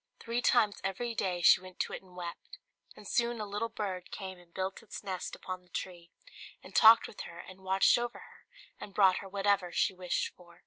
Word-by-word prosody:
Three 235 +1 -2
times 220 -5 +3
every 210 +5 -2
day 180 -5 -1
she - - +7
went 185 -1 -12
to - - -3
it - - -5
and 185 -2 -19
wept; 175 - -8 0.4
and - - -12
soon 235 -1 +1
a 210 - -3
little 210 +3 -3
bird 190 -5 -4
came 190 -2 -7
and 175 -1 -20
built 190 +2 -3
its 225 - -9
nest 185 -2 -4
upon 185 -1 -6
the 180 - -27
tree, 175 -1 -6 0.5
and - - -13
talked 225 +1 +8
with - - -8
her 170 - -9
and 185 +2 -11
watched 190 +5 +4
over 240 0 -3
her, - - -15 0.3
and 200 - -9
brought 190 -3 +5
her 195 - -7
whatever 195 -2 +1
she 195 - +1
wished 180 -1 -2
for. 175 -1 -18
190 Hz, 215 wpm, -31 LUFS, 180-210 Hz, 0.5 s, talked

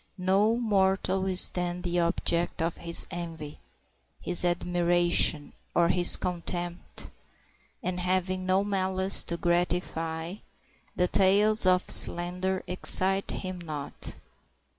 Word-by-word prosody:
No 195 +4 0
mortal 190 -4 -1
is 185 -1 +8
then 180 0 -5
the 175 -1 -2
object 170 0 -2
of 165 +1 -3
his 170 0 +4
envy, 165 -4 -9 0.6
his 175 - +3
admiration, 175 -3 +1 0.2
or 170 -1 +2
his 175 -1 +3
contempt, 175 0 -4 0.7
and, 180 0 -4
having 185 +1 -2
no 190 +1 +1
malice 190 -1 +1
to 170 - -4
gratify, 175 -1 -3 0.6
the 180 - 0
tales 200 +2 +1
of 180 0 +1
slander 180 +2 0
excite 190 +1 +5
him 185 -1 -6
not. 150 -4 -8
180 Hz, 110 wpm, -26 LUFS, 175-190 Hz, 0.7 s, is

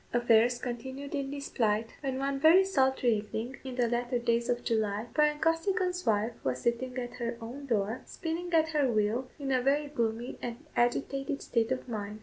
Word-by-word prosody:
Affairs 240 0 +4
continued 260 +3 -6
in 280 -2 -2
this 280 0 -5
plight, 220 -1 +1
when 265 -2 -2
one 275 0 -1
very 325 +6 +7
sultry 265 -9 +2
evening 220 +5 -5
in 260 -2 -6
the 245 -1 +2
latter 240 +1 0
days 235 0 0
of 245 0 0
July, 215 -1 0
Bryan 300 -1 +3
Costigan's 360 +3 +1
wife 220 +2 +2
was 130 -1 -1
sitting 250 +2 -1
at 245 -1 -4
her 235 -1 -3
own 250 +5 -8
door, 220 0 0
spinning 345 +1 -4
at 320 -1 +3
her 290 -5 +2
wheel, 220 +4 0
in 275 -2 -3
a 255 -1 +3
very 280 +3 +2
gloomy 235 -3 -2
and 240 +5 -6
agitated 275 +4 0
state 230 0 0
of 255 0 -2
mind. 210 -2 -5
250 Hz, 185 wpm, -30 LUFS, 230-280 Hz, -, very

